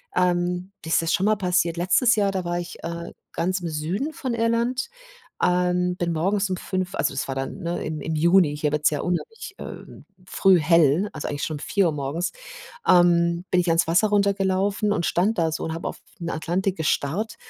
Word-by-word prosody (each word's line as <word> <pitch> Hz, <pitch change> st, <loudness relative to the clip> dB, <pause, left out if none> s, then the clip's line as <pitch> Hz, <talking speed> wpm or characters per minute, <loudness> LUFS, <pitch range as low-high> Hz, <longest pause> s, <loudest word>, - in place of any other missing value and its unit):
ähm 180 Hz, +1 st, 0 dB
mir -, -, -6 dB
ist 165 Hz, -, +3 dB
das 165 Hz, -, -2 dB
ist -, -, +2 dB
schon 190 Hz, -, 0 dB
mal 215 Hz, 0 st, +4 dB
passiert. 180 Hz, -3 st, +1 dB
Letztes 185 Hz, +8 st, +3 dB
Jahr, 200 Hz, -2 st, +2 dB
da 185 Hz, -2 st, -3 dB
war 175 Hz, 0 st, -1 dB
ich, 175 Hz, 0 st, -8 dB
äh, 170 Hz, 0 st, -5 dB, 0.2 s
ganz 185 Hz, +3 st, -1 dB
im 170 Hz, -, -3 dB
Süden 180 Hz, -, -3 dB
von 255 Hz, -4 st, -3 dB
Irland, 235 Hz, -, 0 dB, 0.5 s
ähm, 180 Hz, 0 st, +2 dB
bin 170 Hz, -1 st, -1 dB
morgens 195 Hz, +5 st, 0 dB
um 185 Hz, -, -1 dB
05:00 185 Hz, 0 st, -3 dB
also, 140 Hz, 0 st, 0 dB
das 135 Hz, -, -3 dB
war 135 Hz, -, -2 dB
dann 135 Hz, +8 st, -4 dB
ne, 170 Hz, -1 st, -3 dB
im 155 Hz, -1 st, -4 dB
im 160 Hz, -, -3 dB
Juni, 170 Hz, -1 st, +4 dB
hier 150 Hz, -1 st, 0 dB
wird 150 Hz, 0 st, -1 dB
es -, -, +7 dB
ja 145 Hz, -, -2 dB
unheimlich, 385 Hz, -, -4 dB
ähm, -, -, -10 dB, 0.2 s
früh 190 Hz, 0 st, +4 dB
hell, 165 Hz, +4 st, +3 dB
also, 155 Hz, -, -5 dB
eigentlich 145 Hz, +1 st, -4 dB
schon 155 Hz, -, -2 dB
um -, -, -7 dB
04:00 185 Hz, 0 st, +1 dB
morgens 145 Hz, +5 st, -2 dB, 0.6 s
ähm, 170 Hz, -1 st, +4 dB
bin 180 Hz, -, +4 dB
ich 175 Hz, -, -5 dB
ans 165 Hz, 0 st, +3 dB
Wasser 180 Hz, +6 st, +3 dB
runtergelaufen 200 Hz, +1 st, +1 dB
und 170 Hz, -, -1 dB
stand 205 Hz, +6 st, +1 dB
da 165 Hz, -1 st, +1 dB
so 160 Hz, -, -3 dB
und 160 Hz, -, -3 dB
habe 165 Hz, -, -4 dB
auf -, -, -5 dB, 0.2 s
den 170 Hz, 0 st, -4 dB
Atlantik 180 Hz, +4 st, -1 dB
gestarrt 165 Hz, +9 st, -1 dB
175 Hz, 215 wpm, -24 LUFS, 165-195 Hz, 0.6 s, es